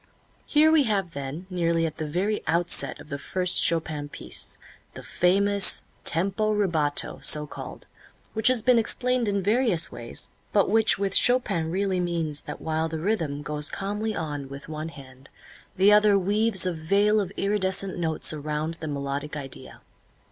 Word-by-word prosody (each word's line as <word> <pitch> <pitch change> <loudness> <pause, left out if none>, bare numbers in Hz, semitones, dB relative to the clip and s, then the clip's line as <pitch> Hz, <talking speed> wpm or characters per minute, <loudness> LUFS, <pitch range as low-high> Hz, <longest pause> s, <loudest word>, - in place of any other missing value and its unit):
Here 310 +1 +4
we 310 -3 +4
have 195 -6 -1
then, 140 +5 -6
nearly 170 -2 0
at 155 -2 -5
the 155 - -4
very 190 +7 -1
outset 170 +2 +2
of - - -13
the 140 - -5
first 185 +4 +3
Chopin 155 -3 -1
piece, - - -4 0.4
the - - -9
famous 200 +2 +2 0.2
tempo 195 +6 +1
rubato, 165 -8 0
so 150 0 +2
called, - - -10 0.5
which 220 -1 +1
has 250 -4 +4
been 250 -1 +4
explained 250 +1 +1
in 200 -1 -1
various 205 -6 +2
ways, 120 -1 -4 0.2
but 200 - +2
which 220 0 +4
with 195 0 -2
Chopin 245 -11 +3
really 190 +1 -1
means 165 -4 -3
that - - -9
while 160 0 -2
the 160 - -4
rhythm 160 -6 -2
goes 150 0 -1
calmly 210 +2 -3
on 145 -4 -5
with 140 0 -10
one 155 +1 -6
hand, 135 -3 -14 0.5
the 200 +3 +5
other 210 -1 +5
weaves 200 +1 +2
a 180 - -1
veil 200 +7 +2
of 190 -2 -5
iridescent 195 -1 0
notes 160 -2 +1
around 155 +1 -3
the 160 - -6
melodic 145 +1 -4
idea. 135 -3 -9
175 Hz, 160 wpm, -25 LUFS, 155-205 Hz, 0.5 s, the